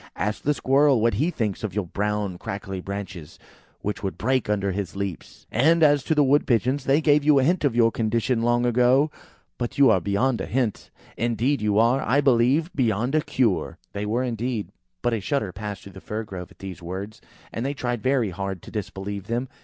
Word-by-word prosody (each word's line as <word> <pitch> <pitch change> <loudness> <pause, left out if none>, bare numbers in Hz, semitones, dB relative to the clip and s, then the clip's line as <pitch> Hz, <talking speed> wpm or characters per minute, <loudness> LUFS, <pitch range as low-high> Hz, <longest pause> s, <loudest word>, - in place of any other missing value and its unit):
Ask 105 +4 -2
the 150 +1 +1
Squirrel 135 -1 +3
what 115 +1 +2
he 155 +6 +1
thinks 110 - -3
of 100 -4 -4
your 105 -3 -1
brown 100 0 -2
crackly 95 -1 -5
branches, 95 -5 -7 0.4
which 105 -1 -3
would 95 -2 -4
break 130 -1 0
under 100 -2 0
his 95 -2 -4
leaps. 100 -3 -6
And 160 +4 +4
as 145 -2 +4
to 160 - +1
the 150 - +5
Wood 140 +2 +3
pigeons, 130 +3 +1
they 140 +3 +3
gave 150 -2 +4
you 150 -1 +5
a 135 - +4
hint 175 +5 +2
of 135 -5 +1
your 115 -1 +4
condition 115 +2 0
long 120 +1 +2
ago. 125 +5 +3 0.5
But 120 -1 -3
you 140 -2 +6
are 95 - +3
beyond 115 +7 0
a - - -4
hint. 120 -4 -1 0.3
Indeed, 120 +4 0
you 105 -1 +1
are, 120 +4 +4
I 135 +4 +2
believe, 135 +5 +3
beyond 120 0 0
a 155 - +3
cure." 120 -10 0 0.2
They 105 +1 -3
were, 120 +4 0
indeed; 120 -2 -2 0.3
but 120 -1 +1
a 115 - 0
shudder 105 -1 -1
passed 100 +1 -6
through 100 - -11
the 95 - -11
Fir 110 +1 -4
grove 95 -4 -8
at - - -20
these 95 -2 -8
words, 95 +5 -6 0.3
and 115 - -3
they 140 +2 -2
tried 120 -4 -2
very 130 -6 +1
hard 95 0 -5
to - - -11
disbelieve 100 -2 -5
them. 120 +3 -2
115 Hz, 210 wpm, -24 LUFS, 100-135 Hz, 0.5 s, you